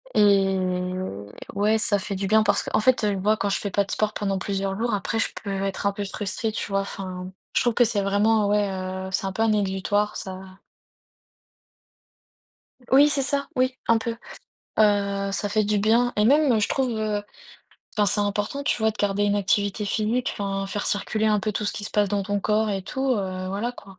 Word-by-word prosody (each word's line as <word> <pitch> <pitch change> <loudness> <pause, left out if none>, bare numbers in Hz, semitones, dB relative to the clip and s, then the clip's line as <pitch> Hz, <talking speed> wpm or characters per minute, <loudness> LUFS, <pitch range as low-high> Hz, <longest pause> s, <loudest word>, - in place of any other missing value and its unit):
Et 200 -2 +5 1.1
ouais, 210 +2 +3
ça 210 -2 +2
fait 195 +1 -4
du 195 +1 -2
bien 215 +2 +4
parce - - +2
qu'en 215 - 0
fait, 255 +1 +3
heu, 205 -1 +1
moi, 210 +3 +2
quand 200 0 -1
je 195 - 0
fais 200 - -4
pas 200 - +2
de 200 - -9
sport 215 0 0
pendant 195 -2 -1
plusieurs 195 0 -2
jours, 235 +1 -1
après, 205 +2 -1
je - - +1
peux 205 - -5
être 195 0 -3
un - - +2
peu 205 - -4
stressé, 205 +3 -3
tu 215 - -4
vois? 195 0 +2
Enfin, 185 -2 -6 0.2
je - - +4
trouve 240 - +2
que 245 - +4
c'est 215 -3 0
vraiment 205 +2 +2
ouais, 205 0 +2
heu, 190 0 -4
c'est 190 +2 -1
un 195 - -2
peu 205 - -3
un 225 -1 +3
exutoire, 205 +1 0
ça. 190 0 -8 2.3
Oui, 280 +3 +7
c'est 285 -1 +1
ça, 280 +1 0
oui, 255 0 +1
un 230 - +5
peu, 230 +1 -3 0.6
heu 200 -2 +2
ça 205 +1 -1
fait 215 +1 +1
du 210 0 +1
bien, 230 +4 +3
et 210 - +3
même, 270 -2 +4
je 205 - +1
trouve 265 -2 0 1.1
enfin 210 -1 +3
c'est 205 - +3
important, 205 +7 -1
tu - - +1
vois, 220 -1 +2
de 215 - -11
garder 205 0 +1
une 205 0 +2
activité 205 +1 0
physique 220 +4 0
enfin 195 -1 -2
faire 205 +1 -3
circuler 215 +2 0
un 210 -1 +3
peu 215 +1 -2
tout 210 - -2
ce 205 - 0
qui 205 - -6
se - - -4
passe 205 -1 +2
dans 200 0 0
ton 205 0 -2
corps 215 +1 +1
et 195 -1 -2
tout, 265 +7 -2
heu, 185 -5 -2
voilà 210 +6 -2
quoi. 195 -5 -14
205 Hz, 215 wpm, -24 LUFS, 195-220 Hz, 2.3 s, Oui